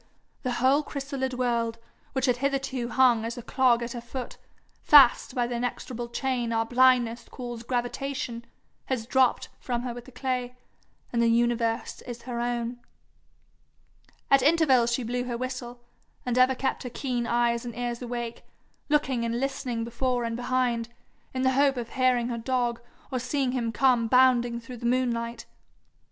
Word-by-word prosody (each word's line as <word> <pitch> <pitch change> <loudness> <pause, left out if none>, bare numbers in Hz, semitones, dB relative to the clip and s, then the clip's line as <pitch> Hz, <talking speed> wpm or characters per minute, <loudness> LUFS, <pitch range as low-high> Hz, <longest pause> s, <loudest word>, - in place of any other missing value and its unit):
the 250 -2 -2
whole 260 +4 +3
chrysalid 275 -3 -4
world, 235 -2 0 0.4
which 265 -1 +1
had 250 -2 +2
hitherto 270 -2 -1
hung 245 -4 +4
as 230 +2 -4
a 240 - -7
clog 245 -1 +3
at 235 - -5
her 240 - -5
foot, 245 +1 -6 0.5
fast 270 -4 +6
by 245 -1 +1
the 240 - -4
inexorable 240 0 -4
chain 245 -1 -1
our 225 0 +1
blindness 245 -1 +3
calls 240 -2 -7
gravitation, 245 0 -3 0.4
has 250 -4 -2
dropped 260 +1 +2
from 240 -1 -3
her 245 -1 -3
with 240 0 -9
the 260 - -13
clay, 250 -1 -3 0.6
and 235 - +2
the 235 - +4
universe 235 0 +1
is 240 -1 -7
her 240 -1 -4
own. 240 0 -2 1.5
At 275 -1 +6
intervals 270 -5 +4
she 240 +1 0
blew 245 +2 -2
her 240 -1 -3
whistle, 245 -1 -6 0.4
and 245 -1 -1
ever 255 +1 +4
kept 265 +1 -2
her 250 - -5
keen 245 -1 -2
eyes 235 0 +1
and 240 -2 -7
ears 240 0 -3
awake, 240 -1 -5 0.5
looking 270 -5 +1
and 235 +1 -1
listening 255 -3 -2
before 245 +1 -1
and 230 0 -2
behind, 245 -1 0 0.4
in 260 0 -2
the 260 - +4
hope 275 0 +3
of 235 -1 -4
hearing 250 -2 +2
her 235 -1 -3
dog, 240 -1 -1 0.3
or 255 - -1
seeing 255 +1 -1
him 240 -3 -1
come 245 -2 +3
bounding 245 -1 +4
through 240 +1 -9
the 235 - -7
moonlight. 235 -2 -1
245 Hz, 165 wpm, -27 LUFS, 235-260 Hz, 1.5 s, fast